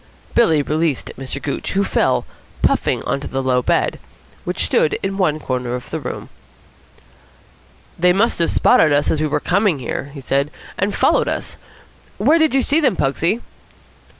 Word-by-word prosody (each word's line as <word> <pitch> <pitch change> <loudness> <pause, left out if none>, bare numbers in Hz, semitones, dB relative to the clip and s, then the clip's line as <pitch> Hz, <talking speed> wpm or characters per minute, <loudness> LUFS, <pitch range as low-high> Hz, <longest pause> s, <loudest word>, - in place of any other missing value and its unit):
Billy 160 -11 +3
released 155 -1 -1
Mr. 135 +1 -6
Gooch, 140 - -4
who 200 +1 +2
fell, - - +1 0.4
puffing, - - +1
on 140 - -1
to 140 - -6
the 135 0 -3
low 125 -1 +2
bed, - - 0 0.5
which - - -1
stood 155 - +2
in 195 0 -2
one 155 -6 +1
corner 125 -3 -3
of 125 - -8
the 160 - -2
room. 125 -4 -6 1.7
"They 180 +1 +5
must 205 +4 +1
have 170 - +2
spotted 155 - +4
us 145 0 +2
as 155 - 0
we 155 - +1
were 150 - 0
coming 195 -3 +1
here," 130 +1 -4
he 140 -1 -9
said, 140 +2 0 0.3
"and 200 +2 -1
followed - - +3
us. - - -3 0.6
Where 325 +2 +4
did 315 -3 +3
you 270 - +3
see 295 +3 +2
them, 270 -7 +2
Pugsy?" 165 - 0
155 Hz, 175 wpm, -19 LUFS, 135-195 Hz, 1.7 s, They